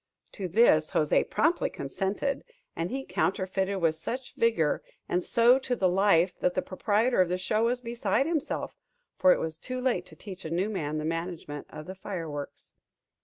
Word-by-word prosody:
To 195 -3 -4
this 170 -5 +4
José 150 -1 +2
promptly 330 +3 +2
consented; 210 +8 -2 0.3
and 165 +1 -2
he 270 +1 -4
counterfeited 190 +1 0
with 165 -3 +3
such 245 +11 -6
vigor, 225 -10 +2 0.3
and 180 0 0
so 240 +3 +5
to 255 -2 -2
the 190 -5 +2
life, 180 -1 +3
that 180 - +1
the 185 - 0
proprietor 215 +4 +1
of 180 - +2
the 180 - 0
show 215 +4 +1
was 245 +1 0
beside 235 +3 0
himself; 320 -2 -2 0.4
for 275 -1 +6
it - - +3
was 160 -1 -2
too 255 0 -5
late 245 -9 0
to - - -13
teach 190 -2 -9
a 160 - -5
new 185 +6 0
man 155 -6 -2
the 155 - -3
management 165 -3 -4
of 155 - -9
the 185 - -6
fireworks. 165 -7 -6
190 Hz, 180 wpm, -28 LUFS, 165-235 Hz, 0.4 s, for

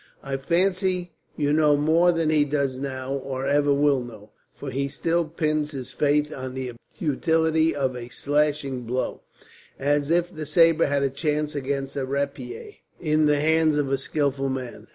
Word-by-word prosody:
I 135 -1 -3
fancy 180 +4 0 0.3
you 145 -1 +1
know 150 -1 +4
more 165 +4 +4
than 165 -2 +1
he 150 -2 +4
does 140 -3 -1
now, 130 -1 -4
or 135 -1 -4
ever 145 +1 +3
will 140 -1 +3
know; 110 -3 -12 0.2
for - - -7
he 140 +2 -1
still 165 +4 0
pins 155 -1 -1
his 130 -3 -6
faith 150 +1 +1
on 130 -1 -6
the 130 -1 -4 0.3
utility 160 -1 +1
of 135 -3 -1
a 120 -1 -7
slashing 145 -1 0
blow, 125 +3 -2 0.6
as 145 +1 +1
if 175 +1 +1
the 155 -1 -5
sabre 165 +1 +4
had 140 0 +1
a 135 - +1
chance 150 +1 -1
against 135 -1 -3
a 140 - -1
rapier, 140 - -4 0.3
in 155 -2 +2
the 150 -1 +3
hands 160 0 +3
of 140 -2 0
a 135 - +2
skilful 135 0 -1
man. 130 -2 -5
145 Hz, 175 wpm, -25 LUFS, 135-155 Hz, 0.6 s, know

